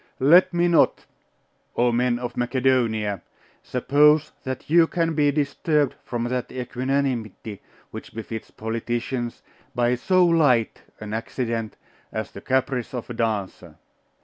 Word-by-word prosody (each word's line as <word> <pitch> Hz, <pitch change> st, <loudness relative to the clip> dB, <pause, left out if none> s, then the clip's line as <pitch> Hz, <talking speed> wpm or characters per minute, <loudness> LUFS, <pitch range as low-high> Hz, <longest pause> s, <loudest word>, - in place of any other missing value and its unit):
'Let 165 Hz, +8 st, +6 dB
me 175 Hz, 0 st, +2 dB
not, 170 Hz, -2 st, +3 dB, 0.7 s
O 120 Hz, 0 st, +3 dB
men 120 Hz, 0 st, +1 dB
of 120 Hz, 0 st, -5 dB
Macedonia, 120 Hz, -6 st, 0 dB, 0.4 s
suppose 150 Hz, +4 st, +3 dB
that 130 Hz, -1 st, -5 dB
you 165 Hz, +1 st, +5 dB
can 165 Hz, -1 st, 0 dB
be 150 Hz, -2 st, +3 dB
disturbed 145 Hz, +1 st, 0 dB
from 120 Hz, -1 st, -3 dB
that 125 Hz, +1 st, -3 dB
equanimity 125 Hz, -5 st, -3 dB, 0.3 s
which -, -, -9 dB
befits 115 Hz, 0 st, -6 dB
politicians, 120 Hz, +2 st, -4 dB, 0.3 s
by 120 Hz, 0 st, +2 dB
so 180 Hz, +9 st, +3 dB
light 145 Hz, -9 st, +2 dB, 0.2 s
an 105 Hz, 0 st, -7 dB
accident 115 Hz, -1 st, -3 dB, 0.4 s
as 110 Hz, 0 st, -4 dB
the -, -, -10 dB
caprice 130 Hz, -1 st, -1 dB
of 120 Hz, 0 st, -5 dB
a -, -, -4 dB
dancer. 100 Hz, -7 st, -3 dB
125 Hz, 125 wpm, -24 LUFS, 115-145 Hz, 0.7 s, Let